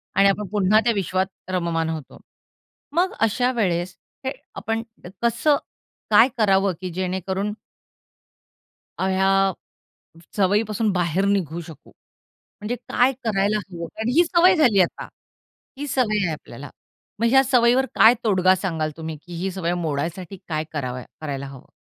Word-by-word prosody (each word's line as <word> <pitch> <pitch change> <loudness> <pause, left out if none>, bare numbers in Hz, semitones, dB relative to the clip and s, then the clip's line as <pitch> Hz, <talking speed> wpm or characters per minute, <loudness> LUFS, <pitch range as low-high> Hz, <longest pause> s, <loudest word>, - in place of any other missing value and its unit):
आणि 200 0 +5
आपण 200 0 -1
पुन्हा 210 0 +3
त्या 235 - +2
विश्वात 190 -1 0 0.2
रममान 170 -3 -1
होतो. 160 -3 -6 0.8
मग 365 +2 +2
अशा 245 +3 +2
वेळेस 180 -6 -1 0.3
हे 265 - 0 0.2
आपण 225 +3 -2 0.4
कसं 285 +5 +2 0.5
काय 220 +3 +7
करावं? 195 -3 +3
की 185 - -4
जेणेकरून 190 +3 -2 1.5
अ, - - 0
ह्या 195 0 +2 0.8
सवयीपासून 210 +2 +1
बाहेर 180 +1 0
निघू 175 -5 0
शकू? 155 -3 -13 0.7
म्हणजे 215 +4 -3
काय 250 +2 +1
करायला 210 0 +1
हवं? 170 -1 -6
आणि 235 +3 0
ही 350 - +7
सवय 350 +2 +5
झाली 240 - +4
आता, 175 - -4 0.7
ही 290 - -4
सवय 215 -7 +1
आहे 165 - -1
आपल्याला. 145 -2 -9 0.5
मग 230 - +3
ह्या 265 +1 +6
सवयीवर 250 +1 +3
काय 225 +2 +7
तोडगा 185 -3 +4
सांगाल 165 -5 -2
तुम्ही? 160 -1 -6
की 175 -1 -10
ही 190 - -1
सवय 175 -2 -1
मोडायसाठी 170 +3 -3
काय 155 -1 -2
करावं 130 -4 -4 0.2
करायला 140 -3 -4
हवं? 135 -2 -12
195 Hz, 140 wpm, -23 LUFS, 170-220 Hz, 1.5 s, काय